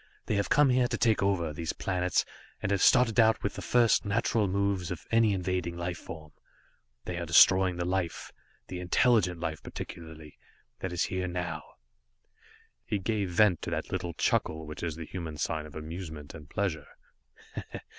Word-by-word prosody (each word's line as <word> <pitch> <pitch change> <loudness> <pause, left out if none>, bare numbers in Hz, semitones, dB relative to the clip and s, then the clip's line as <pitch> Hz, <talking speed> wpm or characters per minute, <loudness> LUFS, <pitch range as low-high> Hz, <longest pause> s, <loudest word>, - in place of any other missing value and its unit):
They - - -1
have 100 -1 0
come 145 -2 +5
here 125 -1 +3
to - - -2
take 115 -3 +2
over 90 -6 +1
these 80 +1 -3
planets, 90 -1 0 0.3
and 100 - -2
have 100 -2 +1
started 125 -2 +5
out 110 -1 +4
with 100 - -1
the - - -6
first, 120 -2 +3
natural 105 0 +1
moves 100 -2 0
of 90 - -6
any 115 -2 +4
invading 90 -2 -2
life 85 0 -3
form. 80 -2 -10 0.7
They 90 - -4
are 85 - -3
destroying 90 +2 +6
the 85 0 -2
life, 90 -1 -2 0.4
the 90 - -5
intelligent 90 -1 +2
life 80 -2 -3
particularly, 80 -2 -9 0.4
that 95 - -4
is 90 -1 0
here 95 0 -2
now." 90 -1 -3 1.2
He 105 - -1
gave 100 0 -1
vent 90 -1 +3
to - - -4
that - - -3
little 85 -1 -3
chuckle 80 0 0
which 75 0 -8
is 85 -3 -3
the 80 0 -7
human 80 -3 -6
sign 75 +1 -2
of 75 - -15
amusement 80 -2 -7
and 75 -2 -11
pleasure. 80 -8 -2
90 Hz, 175 wpm, -29 LUFS, 80-100 Hz, 1.2 s, destroying